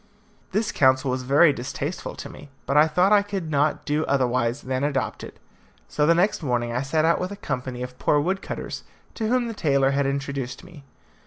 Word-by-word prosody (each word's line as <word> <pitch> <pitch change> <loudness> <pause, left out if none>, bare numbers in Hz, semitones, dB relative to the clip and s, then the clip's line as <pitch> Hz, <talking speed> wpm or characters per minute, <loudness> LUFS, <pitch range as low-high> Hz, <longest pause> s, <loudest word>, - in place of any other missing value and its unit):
This 210 +3 0
counsel 130 -1 +3
was 130 0 -2
very 140 +4 +5
distasteful 140 +6 -5
to - - -7
me, 145 - -12 0.2
but 140 - -1
I 150 +1 +6
thought 180 +6 +3
I 205 - +6
could 195 -6 -5
not 145 +1 +1
do 150 +1 0
otherwise 125 -1 +1
than 130 +1 -2
adopt 140 -3 -2
it. - - -10 0.5
So 150 0 0
the 170 - +5
next 180 +3 +1
morning 120 -4 -1
I 125 - 0
set 155 +3 +1
out 165 - +3
with 180 - -2
a 200 - -6
company 125 -7 -4
of 125 0 -9
poor 150 - +3
wood 190 +6 -1
cutters, - - -6 0.3
to 220 - -3
whom 245 +1 +1
the 230 - -4
tailor 140 -8 +2
had 140 0 +1
introduced 140 -2 -4
me. 175 -6 -14
145 Hz, 210 wpm, -24 LUFS, 130-170 Hz, 0.5 s, I